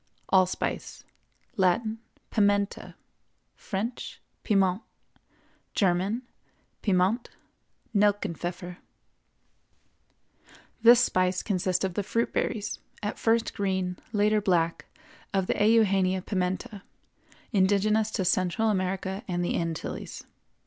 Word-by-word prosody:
ALLSPICE. 185 -1 0 0.5
Latin—Pimenta; 205 0 0 0.6
French—Piment; 195 -2 -2 0.9
German—Piment; 200 +1 -1 0.7
Nelkenpfeffer. 180 -3 0 2.0
This 235 +1 +8
spice 185 -5 +1
consists 185 -2 0
of 185 - -3
the 205 - -1
fruit 230 +4 -1
berries, 210 0 -2 0.2
at 210 - -3
first 230 0 +2
green, 190 -3 -1 0.2
later 210 0 +2
black, 170 -4 +1 0.5
of 190 -1 +2
the 205 - 0
Eugenia 195 -4 +3
Pimenta, 190 +1 -2 0.7
indigenous 210 +2 +3
to 200 -4 -2
Central 185 +5 +2
America 190 +1 -2
and 175 -2 -1
the - - -1
Antilles. 165 -1 -4
195 Hz, 80 wpm, -27 LUFS, 185-215 Hz, 2.0 s, This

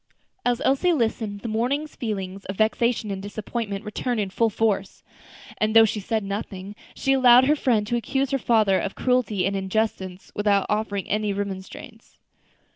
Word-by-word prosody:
As 245 -1 0
Elsie 275 +7 +3
listened 220 -6 -1
the - - -5
morning's 255 +8 -1
feelings 195 -5 -4
of 195 - -5
vexation 220 +1 +1
and 190 -1 -4
disappointment 205 0 -5
returned 235 +3 -2
in 200 -2 -2
full 230 +3 +2
force; 205 -2 -1 0.6
and 215 +1 +1
though 225 0 +9
she 215 0 -2
said 220 +2 -2
nothing, 200 0 -5 0.2
she 270 - +1
allowed 255 -1 +7
her 295 +3 +4
friend 235 -7 +1
to 240 - -1
accuse 270 +3 -1
her 275 - +1
father 215 -5 +3
of 195 - -4
cruelty 245 -7 +1
and 195 +1 0
injustice 190 -1 -2
without 205 -1 +2
offering 210 -2 -1
any 210 0 0
remonstrance. 200 +3 -7
215 Hz, 165 wpm, -24 LUFS, 200-240 Hz, 0.6 s, though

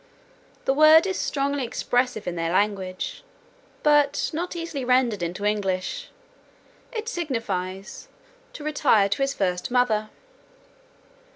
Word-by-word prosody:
The 270 - +3
word 310 +4 +7
is 380 -1 -2
strongly 280 -1 -1
expressive 245 -1 -1
in 175 - -2
their 165 0 -1
language, 190 -1 -1 0.6
but 295 -1 +3
not 350 +3 -3
easily 335 -5 -4
rendered 250 -5 +2
into 175 +4 -3
English; 205 - -1 0.8
it 455 -1 -5
signifies, 210 - -4 0.5
"to 295 - -9
retire 280 -9 +3
to 200 - -1
his 275 0 0
first 180 -2 -1
mother." 225 -4 +1
245 Hz, 115 wpm, -24 LUFS, 195-295 Hz, 0.8 s, word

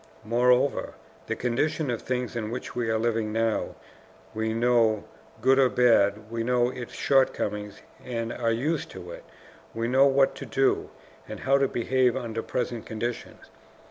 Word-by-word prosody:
Moreover, 125 +4 +2 0.3
the - - -1
condition 135 +4 -1
of 120 - -3
things 125 -1 -3
in 110 -2 -3
which 125 +2 -6
we 120 -2 -1
are 110 - +2
living 110 -1 0
now, 115 0 -1 0.6
we 110 0 -1
know, 115 -2 +2 0.4
good 135 +3 +4
or 130 -2 +5
bad; 110 -4 +3
we 115 0 -2
know 125 0 +2
its 125 -2 -8
shortcomings 105 -6 0 0.2
and 115 -2 -3
are 115 -2 0
used 140 +7 -1
to 90 -2 -9
it, - - -9 0.5
we 115 +1 -1
know 135 +3 +5
what 135 0 +3
to - - -7
do, 135 0 +1 0.4
and - - -8
how 135 +2 +3
to 135 - +3
behave 125 +1 +1
under 115 -3 -4
present 120 -2 -3
conditions. 120 +2 -5
120 Hz, 160 wpm, -26 LUFS, 115-130 Hz, 0.6 s, or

